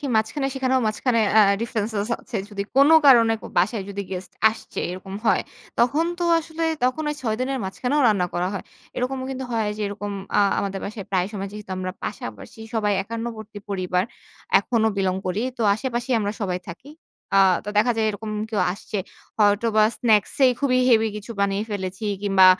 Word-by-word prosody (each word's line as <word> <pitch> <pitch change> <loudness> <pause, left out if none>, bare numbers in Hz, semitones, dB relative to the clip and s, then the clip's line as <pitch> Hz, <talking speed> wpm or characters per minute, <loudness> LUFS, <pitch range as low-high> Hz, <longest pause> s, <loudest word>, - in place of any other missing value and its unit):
কি, 290 - -4
মাঝখানে 220 +6 0
সেখানেও 260 -1 +1
মাঝখানে 230 +2 +1 0.2
আ - - +9 0.2
ডিফারেনসেস 220 -2 -2
আছে। 235 - -6
যদি 200 -1 -3
কোন 280 +1 +7 0.2
কারণে, 235 -4 +7
কো - - -8
বাসায় 215 -5 +1
যদি 200 0 -4
গেস্ট 185 0 -6 0.2
আসছে, 225 - -7
এরকম 185 +2 -7
হয়। - - +3 0.4
তখন 280 +7 +3
তো 350 - -1
আসলে, 325 0 -6 0.2
তখন 255 +5 +1
ওই - - -2
৬ 220 -3 0
দিনের 265 +1 -1
মাঝখানেও 250 +9 -1
রান্না 200 -5 +2
করা 175 +1 0
হয়। 200 - -5 0.3
এরকমও 260 +1 -2
কিন্তু 265 0 -4
হয় 220 -2 0
যে - - -7
এরকম 205 0 -5 0.3
আ - - +6 0.2
আমাদের 195 -1 -2
বাসায় 200 -1 -6
প্রায় 185 -2 +1
সময় 200 -1 -4
যেহেতু 210 -2 -9
আমরা 185 0 -3
পাশাপাশি 110 - -7
সবাই 210 -2 +1
একান্নবর্তী 225 -1 -6
পরিবার, 180 -2 0 0.6
এখনো 225 -3 +1
বিলং 190 -2 +1
করি। 185 +5 -1 0.2
তো, - - 0
আশেপাশেই 245 +2 -2
আমরা 205 -1 -1
সবাই 185 -3 -1
থাকি। 240 +12 -11 0.5
আ - - +7 0.3
তো - - -7
দেখা 240 +3 +4
যায়, 220 -1 +2
এরকম 215 +1 -6 0.2
কেউ 210 -4 0
আসছে। 205 +2 -5 0.4
হয়তো 205 +1 +3
বা 215 - +7
স্নাকস 215 -4 +2
এই 255 - +4
খুবই 260 -3 +2
হেভি 225 -2 +5
কিছু 210 +2 -9
বানিয়ে 200 +1 +1
ফেলেছি 190 0 -4 0.2
কিংবা 195 -2 +6
215 Hz, 185 wpm, -23 LUFS, 200-245 Hz, 0.6 s, আ